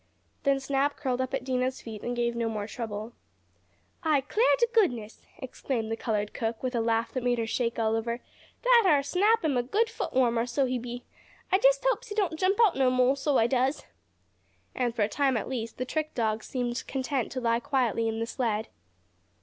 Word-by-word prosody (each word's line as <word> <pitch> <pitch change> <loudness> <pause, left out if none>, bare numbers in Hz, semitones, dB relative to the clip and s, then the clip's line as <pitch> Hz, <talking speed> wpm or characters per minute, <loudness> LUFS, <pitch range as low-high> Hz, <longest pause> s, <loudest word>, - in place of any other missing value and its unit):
Then 275 -1 +2
Snap 275 +1 0
curled 255 -2 -1
up 260 - -2
at 270 -2 -2
Dinah's 255 0 -1
feet 220 -3 -8
and 245 0 -3
gave 235 0 0
no 230 -1 -1
more 210 -2 -3
trouble. 220 0 -6 0.9
"I 305 -3 +2
'clar 435 - +1
t' 475 - +4
goodness!" 245 - +1 0.2
exclaimed 250 -3 -4
the - - 0
colored 210 -3 -2
cook, 225 0 -3
with 255 0 -1
a 235 - +1
laugh 225 0 0
that 255 - -2
made 245 -1 +2
her 230 - -1
shake 230 +1 -1
all 225 -1 +1
over, 235 +1 -2 0.4
"dat 485 -4 +6
ar' 285 -2 +4
Snap 405 +7 +2
am 285 -5 +1
a - - +3
good 425 - 0
foot - - -4
warmer, 240 -2 +2
so 255 +3 +1
he 255 -1 -1
be. 245 +1 -7 0.5
I 380 - +4
jest - - +4
hopes - - 0
he 415 - -6
don't 370 -7 0
jump 385 +2 +2
out 395 - +1
no 265 -1 +3
mo', 255 +1 +3
so 280 0 +1
I 225 - +4
does." 260 +3 0 0.9
And, 245 -2 -1
for 220 - +2
a - - +2
time 265 +3 +1
at - - -3
least, 230 -3 -4
the 255 - -2
trick 310 +3 -3
dog 220 -2 0
seemed 245 -1 -3
content 265 -1 -2
to 260 - -2
lie 230 -1 +1
quietly 240 -3 0
in 225 0 -2
the 230 - -1
sled. 225 -3 -2
250 Hz, 215 wpm, -28 LUFS, 230-280 Hz, 0.9 s, dat